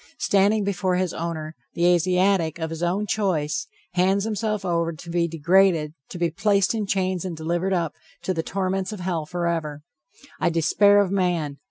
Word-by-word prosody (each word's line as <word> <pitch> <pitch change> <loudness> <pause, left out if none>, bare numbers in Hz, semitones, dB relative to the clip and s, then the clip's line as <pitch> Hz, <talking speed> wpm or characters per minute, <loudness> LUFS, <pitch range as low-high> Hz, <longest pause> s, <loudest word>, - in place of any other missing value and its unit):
Standing 205 +2 +2
before 190 -2 0
his 180 -1 0
owner, 160 -1 -4 0.2
the 170 +1 +1
Asiatic, 180 -1 +2
of 160 -1 -4
his 165 0 -5
own 180 +4 0
choice, 185 -8 -1 0.3
hands 190 +2 +2
himself 215 -2 -2
over 170 -1 0
to 170 +2 -11
be 170 0 +1
degraded, 165 -1 +2 0.2
to - - -7
be 170 -2 0
placed 200 +2 +2
in 215 -3 -2
chains 185 -2 0
and 180 -4 -5
delivered 170 +4 -1
up 170 -4 0 0.3
to 185 - 0
the 165 - -1
torments 190 +2 -2
of 210 -4 -7
hell 170 -4 -2
forever. 165 -4 -2 0.6
I - - +2
despair 200 +5 +4
of 195 -2 -1
man. 175 -7 0
180 Hz, 175 wpm, -24 LUFS, 165-195 Hz, 0.6 s, despair